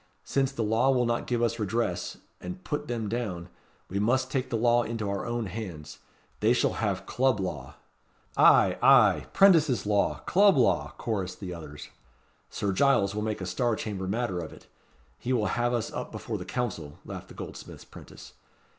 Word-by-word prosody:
Since 135 -1 0
the 120 -4 -2
law 110 +5 +2
will 125 -2 +3
not 120 0 -1
give 120 -1 0
us 115 0 0
redress, 105 -3 -2 0.2
and 180 0 -8
put 150 - -3
them 115 -3 -3
down, 100 -6 -4 0.4
we 100 - -3
must 130 +5 +1
take 130 -2 -1
the 115 - -1
law 120 +1 +3
into 115 -3 -3
our 100 +3 -3
own 120 -1 -2
hands. 85 -9 -7 0.4
They - - +4
shall - - +1
have - - -1
Club 130 -4 +1
Law." 75 -8 -5 0.6
"Ay, - - +5
ay - - +5
'Prentices' 160 - +5
law 105 -1 +1
Club 200 -1 +5
law!" 125 - +2
chorussed 95 -5 -3
the 90 -3 -6
others. 75 -3 -9 0.6
"Sir 100 -2 -2
Giles 120 -4 +3
will 105 - -2
make 110 -1 -3
a - - -3
Star 120 +4 0
Chamber 100 -4 -4
matter 100 -3 -1
of 80 - -6
it. - - -15 0.5
He 130 - -2
will 110 -4 +1
have 120 0 +1
us 120 -2 -2
up - - -5
before - - -5
the - - -7
Council," 90 - -4
laughed - - -8
the - - -14
goldsmith's - - -9
'prentice. - - -13
115 Hz, 180 wpm, -28 LUFS, 95-125 Hz, 0.6 s, Ay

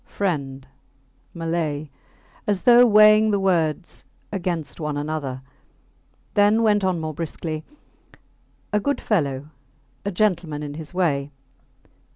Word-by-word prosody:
Friend, 140 -8 -3 0.6
Malay, 165 -3 -3 0.6
as 205 -3 0
though 245 0 +7
weighing 215 0 +6
the 200 -1 +1
words 175 -3 -1 0.3
against 175 -7 -3
one 150 -2 -3
another, 145 -3 -4 0.9
then 210 +2 +4
went 210 -2 +3
on 185 -2 +1
more 155 -1 -4
briskly 160 -1 -5 1.1
A 210 - +3
good 285 +7 -1
fellow 145 - -1 0.5
a 200 - -2
gentleman 175 -6 0
in 145 -1 -6
his 155 0 -8
way. 145 -6 0
165 Hz, 115 wpm, -23 LUFS, 150-205 Hz, 1.1 s, though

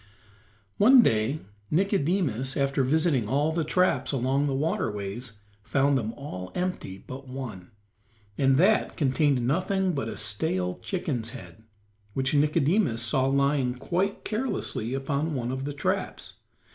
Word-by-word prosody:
One 245 +4 +8
day 110 - +1 0.3
Nicodemus, 160 - +1
after 140 0 +1
visiting 140 -5 +1
all 145 +4 +2
the 165 0 0
traps 155 -5 +1
along 135 +2 +1
the 135 - -1
waterways, 110 -5 -2 0.3
found 135 +6 +2
them 110 -4 -1
all 90 -10 -7
empty 180 - -3
but 130 +6 -10
one, 125 -9 -7 0.7
and 135 +2 +3
that 200 +7 +3
contained 140 -3 +2
nothing 185 +6 +1
but 135 -7 -2
a - - -6
stale 100 - -2
chicken's 135 - -2
head, 90 +5 -14 0.5
which 130 +1 0
Nicodemus 150 - +2
saw 130 +3 +2
lying 140 -2 +1
quite 180 +9 -2
carelessly 215 - -2
upon 140 +3 -1
one 120 -1 -2
of 130 +1 -3
the 145 - -3
traps. 140 - -3
135 Hz, 135 wpm, -27 LUFS, 120-160 Hz, 0.7 s, One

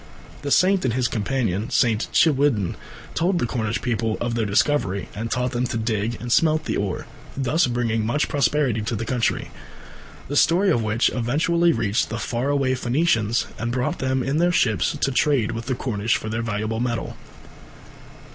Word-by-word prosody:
The 145 - -4
saint 185 +5 +3
and 125 -3 0
his 130 -2 +1
companion, 110 -3 -1
St. 115 -3 +2
Chiwidden, 135 - +2 0.4
told 175 +2 +1
the 165 - 0
Cornish 115 -2 -2
people 115 -3 -1
of 120 0 -2
their 115 -2 0
discovery, 100 -2 +1
and 115 +2 -4
taught 125 +1 -1
them 125 0 -1
to 120 - -3
dig 110 0 -1
and 120 +2 -5
smelt 155 +3 +3
the - - -1
ore, 100 -2 -2 0.3
thus 140 +5 +2
bringing 120 -2 0
much 130 +7 0
prosperity 135 -4 +1
to 110 +2 -2
the 110 +2 -3
country, 120 +1 -1 0.8
the 145 - -4
story 180 +6 +4
of 120 - +2
which 110 +2 +1
eventually 160 +8 +2
reached 110 -7 0
the 110 - -3
far 120 +3 -2
away 135 -2 +1
Phoenicians 120 -3 +1
and 120 0 -2
brought 125 0 -1
them 130 -1 0
in 135 +3 -1
their 175 +2 +3
ships 110 - +1
to 135 - +1
trade 130 -4 +2
with 115 +1 -6
the 130 - 0
Cornish 115 -3 -1
for 110 - -6
their 110 +1 -2
valuable 110 0 -2
metal. 120 -1 -2
120 Hz, 180 wpm, -23 LUFS, 110-140 Hz, 0.8 s, story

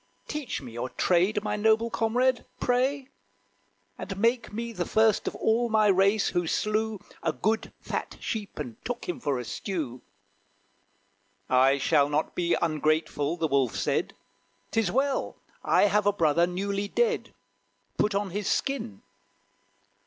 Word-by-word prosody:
Teach 300 - -4
me 125 - -8
your 120 +2 -4
trade, 185 +8 +2
my - - -1
noble 220 +2 +2
comrade, 245 +3 +1 0.2
pray! 260 +2 0 1.1
Make 230 +2 +1
me 230 +2 -4
the 180 -4 -2
first 220 +2 +2
of - - -2
all 235 +2 +1
my 215 -1 +3
race 195 +2 +3
who 175 -1 -1
slew 215 +3 0 0.2
A - - +1
good 220 +1 -1
fat - - -4
sheep, 210 -4 -4
and 125 -7 -7
took 245 -1 -4
him 180 - -3
for 140 -3 -1
a 125 - -5
stew!" 145 - -4 1.5
"I 130 +2 +4
shall 145 0 +3
not 150 +2 -1
be 175 -1 +1
ungrateful," 155 -1 0
the 165 - 0
Wolf 135 -5 +1
said; - - -1 0.6
"'Tis 220 -6 +1
well, 270 +2 0 0.3
I - - +4
have 205 0 +3
a - - +6
brother 170 -2 +3
newly 200 +3 -2
dead; 465 - 0 0.6
Put 210 -1 +2
on 200 -2 -1
his 205 +2 -2
skin." 250 - -2
200 Hz, 145 wpm, -27 LUFS, 155-225 Hz, 1.5 s, a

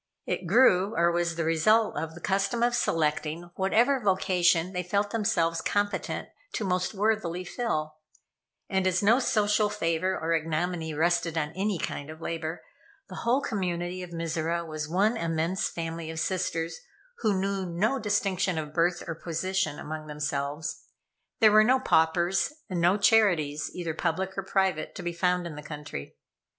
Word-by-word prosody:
It 180 - -3
grew, 200 -1 +4
or 170 +1 +4
was 170 -1 0
the 165 - -1
result 210 +8 +3
of 160 +2 -4
the 175 - -11
custom 200 +5 0
of 240 0 +3
selecting 160 -4 -1
whatever 235 +9 +2
vocation 185 -4 +2
they 180 - -1
felt 200 +3 -1
themselves 165 -7 +1
competent 205 +3 -1 0.3
to - - -2
most 180 +2 -1
worthily 200 -4 0
fill, 155 -7 -3 0.7
and 190 -1 +1
as 185 +1 +1
no 225 +5 +5
social 210 -4 +2
favor 185 -2 0
or 165 +1 0
ignominy 165 +1 -1
rested 165 0 +1
on 150 -1 -1
any 195 +2 -1
kind 145 -2 -4
of 155 0 -9
labor, 165 0 -4 0.5
the - - -8
whole 245 +4 +1
community 180 -5 -2
of 180 - -7
Mizora 165 0 -2
was 155 -2 -5
one 200 +7 +2
immense 165 +2 -1
family 165 -1 -5
of 160 0 -4
sisters 165 -2 -1 0.4
who 210 -4 +1
knew 195 -1 -1
no 210 +10 0
distinction 195 -4 0
of 150 -1 -4
birth 175 +2 +1
or 165 - -2
position 170 0 -2
among 155 0 -6
themselves. 150 +1 -3 0.6
There 215 -1 +7
were 215 +1 +7
no 255 +4 +4
paupers 175 - +2 0.2
and 175 -2 -1
no 175 +4 +4
charities, 175 -10 +3
either 170 -3 -3
public 190 +4 -2
or 195 - -1
private, 190 -4 0
to 180 - -6
be 175 0 -2
found 180 0 +1
in 170 - -5
the 150 - -8
country. 150 - -8
175 Hz, 160 wpm, -28 LUFS, 165-200 Hz, 0.7 s, There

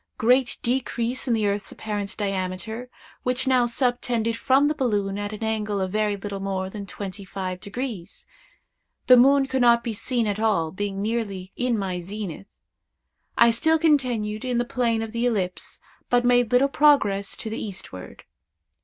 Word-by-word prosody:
Great 250 +1 +3
decrease 245 0 -1
in 235 - +3
the 215 -2 0
earth's 205 0 -1
apparent 205 -2 -5
diameter, 200 +4 -3 0.3
which 250 +1 -1
now 255 -2 +3
subtended 240 -2 0
from 270 +4 +3
the 300 - +1
balloon 205 -8 -1
an 205 +1 -5
angle 215 -2 -1
of 190 -1 -2
very 210 0 0
little 200 0 -5
more 190 -1 -3
than 200 -1 -7
twenty 200 +1 -7
five 185 -1 -5
degrees. 210 -3 -6 0.8
The 255 - +8
moon 270 +3 +5
could 265 -1 -1
not 235 -1 +5
be 235 - -3
seen 230 +2 -1
at 205 0 -2
all, 195 -8 +1
being 195 +1 -3
nearly 205 -4 -3
in 245 -2 0
my 190 -3 -2
zenith. 195 0 -6 0.9
I 235 0 +6
still 320 +8 +2
continued 245 -9 +1
in 250 -2 -1
the 240 - +1
plane 235 -2 0
of 225 - -6
the 235 +1 0
ellipse, 190 -6 -3 0.3
but 245 0 +3
made 245 -1 +3
little 250 +3 +5
progress 275 -10 +3
to 220 - -5
the 220 - -4
eastward. 180 - -8
220 Hz, 165 wpm, -24 LUFS, 200-245 Hz, 0.9 s, The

